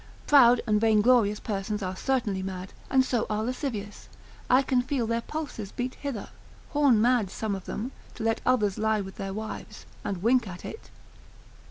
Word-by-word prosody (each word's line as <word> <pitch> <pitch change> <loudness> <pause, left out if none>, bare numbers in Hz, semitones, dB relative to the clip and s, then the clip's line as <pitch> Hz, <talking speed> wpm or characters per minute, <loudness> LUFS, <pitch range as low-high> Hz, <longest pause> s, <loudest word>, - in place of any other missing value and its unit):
Proud 245 -4 +6
and 210 -2 +2
vainglorious 220 -1 +4
persons 205 0 -3
are 185 0 -3
certainly 220 -5 0
mad; 190 0 -6 0.2
and 260 -1 +4
so 245 -3 0
are 215 0 0
lascivious; 230 -4 -4 0.4
I 255 +2 +5
can 260 -2 +2
feel 255 -1 -1
their 230 +1 0
pulses 285 -9 -5
beat 250 +1 -3
hither; 270 -8 -5 0.4
horn 285 -7 +4
mad 235 -3 +3
some 215 +1 -3
of 190 -1 -5
them, 235 +5 -4 0.2
to 230 - -6
let 225 0 +1
others 215 -6 +2
lie 220 -1 +2
with 190 -1 -8
their 195 -1 -4
wives, 215 +2 -7 0.2
and 195 -3 -3
wink 245 0 +3
at 180 -1 -8
it. 445 - -8
220 Hz, 175 wpm, -27 LUFS, 205-255 Hz, 0.4 s, Proud